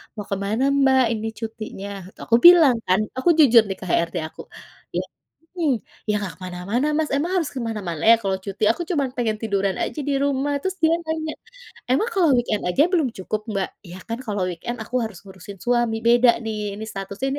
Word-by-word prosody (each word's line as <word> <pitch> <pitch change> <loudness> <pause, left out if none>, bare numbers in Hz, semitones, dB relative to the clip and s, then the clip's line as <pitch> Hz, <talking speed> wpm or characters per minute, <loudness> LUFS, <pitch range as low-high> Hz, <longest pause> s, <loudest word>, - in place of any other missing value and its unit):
"Mau 210 - -5
kemana 200 +5 -1
Mbak 270 -2 +4
ini 220 - -4
cutinya?" 220 -3 -6 0.3
Tuh - - -15
aku 230 - +6
bilang 325 -8 +8
kan 185 +2 +3 0.2
aku 260 - +2
jujur 240 -6 +7
nih 195 - -3
ke - - -6
HRD 170 +1 +1
aku - - -11 0.5
ya, - - 0 0.5
mhm, 335 -6 0 0.4
"ya 210 - +3
nggak 205 -4 -4
kemana-mana 185 +9 -2
Mas 315 -1 0
emang 300 +6 0
harus 335 -5 0
kemana-mana 215 - -4
ya 230 - +8
kalau 195 -1 0
cuti 200 +1 -2
aku 345 - -5
cuman 285 -6 +1
pengen 225 -3 0
tiduran 200 -3 0
aja 305 - -3
di 285 - +1
rumah" 280 0 0
terus 380 0 -2
dia 320 0 +4
nanya, 315 -1 -3 0.6
"emang 430 - +2
kalau 375 -7 +3
weekend 240 -4 0
aja 220 +11 +3
belum 330 -7 +2 0.2
cukup, 215 +2 -2
Mbak?" 195 -2 -1 0.2
"Ya 175 - -9
kan 230 +1 -4
kalau 205 -4 -2
weekend 180 +8 -5
aku 250 +3 -7
harus 220 -5 -6
ngurusin 195 +1 -11
suami 240 -2 +1
beda 240 +1 +6
nih 210 -2 -4
ini 215 - -7
statusnya 200 +6 -4
230 Hz, 195 wpm, -22 LUFS, 200-280 Hz, 0.6 s, bilang